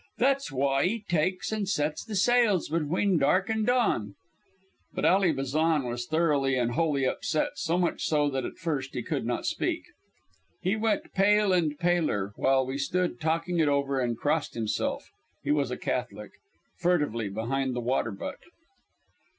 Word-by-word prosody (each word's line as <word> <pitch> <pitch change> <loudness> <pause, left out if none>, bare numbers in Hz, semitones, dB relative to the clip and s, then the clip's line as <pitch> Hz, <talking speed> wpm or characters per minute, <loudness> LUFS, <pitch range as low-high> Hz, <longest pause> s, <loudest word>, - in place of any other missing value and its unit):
That's 275 -1 +2
w'y 135 0 +1
'e 215 +4 -1
takes 180 +5 0
an' 210 -2 -2
sets 150 -5 -1
the 215 - -6
sails 220 -2 +3
between 170 +4 +1
dark 185 +9 +2
an' 220 -1 0
dawn." 210 - +1 0.8
But - - -1
Ally 190 -2 +4
Bazan 150 +2 +1
was 120 0 -4
thoroughly 150 -4 +2
and 120 -1 +1
wholly 145 -2 +1
upset, 155 +4 0
so 165 +2 0
much 180 -1 0
so 150 -2 +2
that 135 -1 -2
at - - -6
first 145 -7 -3
he - - -2
could - - -2
not - - -2
speak. - - -1 0.8
He 185 +4 0
went 220 0 -1
pale 205 0 +4
and 160 -5 +1
paler 155 - 0
while 135 0 +2
we 135 +2 -4
stood 175 -2 -1
talking 165 +2 0
it 155 - +3
over, 140 -1 +1
and 120 -2 -1
crossed 150 +4 -1
himself 110 -2 -2 0.3
he 145 - 0
was 145 -3 +1
a 125 - -3
Catholic 105 -4 -4 0.5
furtively 150 - +1
behind 125 +5 -2
the - - -1
water 120 -1 0
butt. 100 -2 -6
150 Hz, 165 wpm, -28 LUFS, 130-180 Hz, 0.8 s, Ally